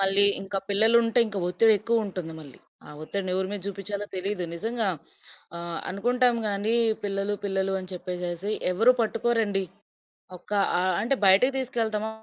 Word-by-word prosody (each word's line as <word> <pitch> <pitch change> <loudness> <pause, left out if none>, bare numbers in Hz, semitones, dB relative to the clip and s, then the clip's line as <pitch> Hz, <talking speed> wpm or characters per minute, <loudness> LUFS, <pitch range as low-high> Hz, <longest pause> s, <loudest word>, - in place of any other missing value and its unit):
మళ్ళీ 195 +1 +7 0.2
ఇంకా 195 0 -3
పిల్లలుంటే 230 +3 +4
ఇంకా 210 -2 -5
ఒత్తిడేక్కువుంటుంది 205 -3 +1
మళ్ళీ. 140 -5 -13 0.3
ఆ - - -14
ఒత్తిడిని 190 +3 -4
ఎవరి 190 0 -1
మీద 205 - -3
చూపించాలో 200 +1 -4
తెలీదు. 190 0 -3
నిజంగా, 225 +4 -2 0.7
ఆహ్, 170 0 -5
అనుకుంటాం 245 +5 +1
గానీ 205 +3 0 0.3
పిల్లలు 200 0 -1
పిల్లలు 195 -1 -1
అని 185 0 -10
చెప్పేసేసి 180 +1 -4 0.2
ఎవరు 225 +7 +5
పట్టుకోరండి. 225 -3 0 0.7
ఒక 180 - -22 0.3
ఆహ్, 185 +1 +1
అంటే 255 +5 +1
బయటకి 200 +8 +5
తీసుకెళ్తాము, 220 -4 -2
200 Hz, 135 wpm, -26 LUFS, 185-225 Hz, 0.7 s, మళ్ళీ